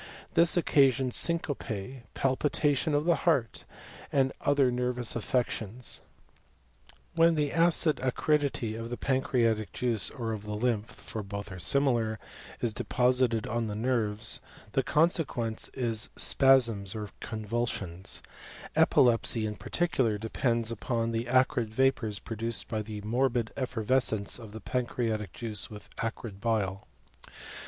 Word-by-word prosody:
This 170 Hz, +2 st, +5 dB
occasions 135 Hz, -6 st, +3 dB
syncope, 135 Hz, -, -2 dB
palpitation 145 Hz, +2 st, +1 dB
of 145 Hz, +1 st, +1 dB
the 170 Hz, -1 st, +3 dB
heart, 135 Hz, -10 st, 0 dB, 0.5 s
and 135 Hz, -1 st, +2 dB
other 140 Hz, -3 st, +3 dB
nervous 125 Hz, -1 st, -1 dB
affections. 120 Hz, -1 st, -2 dB, 1.1 s
When 165 Hz, 0 st, +4 dB
the 150 Hz, -2 st, 0 dB
acid 165 Hz, -1 st, +3 dB
acridity 135 Hz, -2 st, 0 dB
of 115 Hz, +1 st, -6 dB
the 120 Hz, -, -4 dB
pancreatic 115 Hz, -5 st, +1 dB
juice 120 Hz, -4 st, +1 dB
or 115 Hz, -3 st, -4 dB
of 110 Hz, -2 st, -4 dB
the 105 Hz, 0 st, -5 dB
lymph 115 Hz, -1 st, 0 dB
(for 110 Hz, 0 st, -7 dB
both 100 Hz, 0 st, -6 dB
are 95 Hz, -, -7 dB
similar) 120 Hz, 0 st, +1 dB, 0.4 s
is 115 Hz, -3 st, 0 dB
deposited 125 Hz, -1 st, +1 dB
on 115 Hz, 0 st, -1 dB
the 105 Hz, -, -4 dB
nerves, 110 Hz, -2 st, +1 dB, 0.3 s
the 135 Hz, -, +2 dB
consequence 140 Hz, -7 st, 0 dB
is 115 Hz, -4 st, -1 dB
spasms 115 Hz, -8 st, +3 dB
or 105 Hz, -2 st, -5 dB
convulsions; 110 Hz, -5 st, -3 dB, 0.5 s
epilepsy 115 Hz, -2 st, +4 dB
in 105 Hz, 0 st, -3 dB
particular 130 Hz, -8 st, 0 dB
depends 115 Hz, +1 st, -1 dB
upon 115 Hz, 0 st, -1 dB
the 115 Hz, +1 st, -2 dB
acrid 130 Hz, -2 st, +2 dB
vapours 115 Hz, -4 st, +1 dB
produced 115 Hz, +1 st, -3 dB
by 110 Hz, -1 st, -2 dB
the 105 Hz, -1 st, -6 dB
morbid 120 Hz, +1 st, 0 dB
effervescence 125 Hz, -4 st, 0 dB
of 110 Hz, -3 st, -10 dB
the 110 Hz, +1 st, -8 dB
pan 125 Hz, +4 st, -1 dB
creatic 110 Hz, -6 st, -2 dB
juice 110 Hz, -4 st, -2 dB
with 105 Hz, -1 st, -11 dB
acrid 115 Hz, -3 st, -5 dB
bile. 105 Hz, -5 st, -1 dB
115 Hz, 130 wpm, -29 LUFS, 110-130 Hz, 1.1 s, This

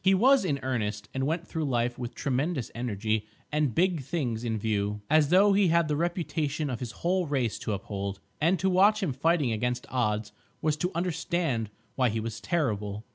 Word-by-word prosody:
He 190 Hz, +1 st, +5 dB
was 260 Hz, +6 st, +5 dB
in 145 Hz, -7 st, 0 dB
earnest, 105 Hz, -5 st, -2 dB
and 135 Hz, 0 st, -1 dB
went 165 Hz, +2 st, -2 dB
through 160 Hz, -2 st, -2 dB
life 120 Hz, -2 st, 0 dB
with 120 Hz, -2 st, -5 dB
tremendous 140 Hz, 0 st, -1 dB
energy 110 Hz, -2 st, -1 dB, 0.2 s
and 150 Hz, -5 st, +1 dB
big 175 Hz, -3 st, +2 dB
things 125 Hz, -5 st, -2 dB
in 115 Hz, -2 st, -1 dB
view, 105 Hz, -1 st, -1 dB
as 155 Hz, -2 st, +5 dB
though 195 Hz, +3 st, +6 dB
he 195 Hz, -1 st, +4 dB
had 170 Hz, -1 st, +3 dB
the 150 Hz, -, 0 dB
reputation 155 Hz, -3 st, -1 dB
of 120 Hz, -, -3 dB
his 120 Hz, -2 st, -5 dB
whole 180 Hz, 0 st, +2 dB
race 130 Hz, -6 st, 0 dB
to 110 Hz, -, -2 dB
uphold. 100 Hz, 0 st, -4 dB, 0.2 s
And 170 Hz, +5 st, +4 dB
to 190 Hz, -, 0 dB
watch 200 Hz, +3 st, +4 dB
him 155 Hz, -8 st, 0 dB
fighting 150 Hz, -1 st, +2 dB
against 125 Hz, +3 st, -1 dB
odds 105 Hz, -4 st, 0 dB, 0.3 s
was 155 Hz, -1 st, +1 dB
to 180 Hz, +4 st, -1 dB
understand 170 Hz, -, -1 dB, 0.2 s
why 130 Hz, -2 st, +2 dB
he 110 Hz, +1 st, -1 dB
was 110 Hz, 0 st, -5 dB
terrible. 105 Hz, -, -1 dB
135 Hz, 190 wpm, -28 LUFS, 110-170 Hz, 0.3 s, though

